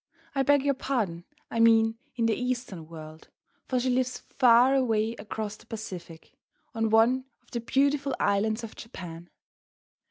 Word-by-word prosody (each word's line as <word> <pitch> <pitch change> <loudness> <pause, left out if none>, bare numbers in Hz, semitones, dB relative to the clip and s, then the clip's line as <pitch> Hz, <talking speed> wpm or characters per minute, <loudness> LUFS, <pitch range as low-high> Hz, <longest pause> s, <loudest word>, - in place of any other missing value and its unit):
I 275 - +1
beg 285 0 +4
your 280 - +3
pardon 215 -11 -2 0.3
I 230 - -2
mean 225 0 +4 0.2
in 235 -2 0
the 225 - +3
Eastern 240 -9 -3
world, 155 -1 -11 0.4
for 255 - +1
she 255 +1 0
lives 255 0 0
far 250 +1 +4
away 225 -4 +1
across 215 0 -5
the - - -20
Pacific, 180 -7 -8 0.4
on 225 0 0
one 235 +4 +4 0.2
of - - -29
the 240 - -2
beautiful 275 +3 +1
islands 215 +3 +1
of 225 - -8
Japan. 175 -6 -9
225 Hz, 155 wpm, -28 LUFS, 205-255 Hz, 0.4 s, beg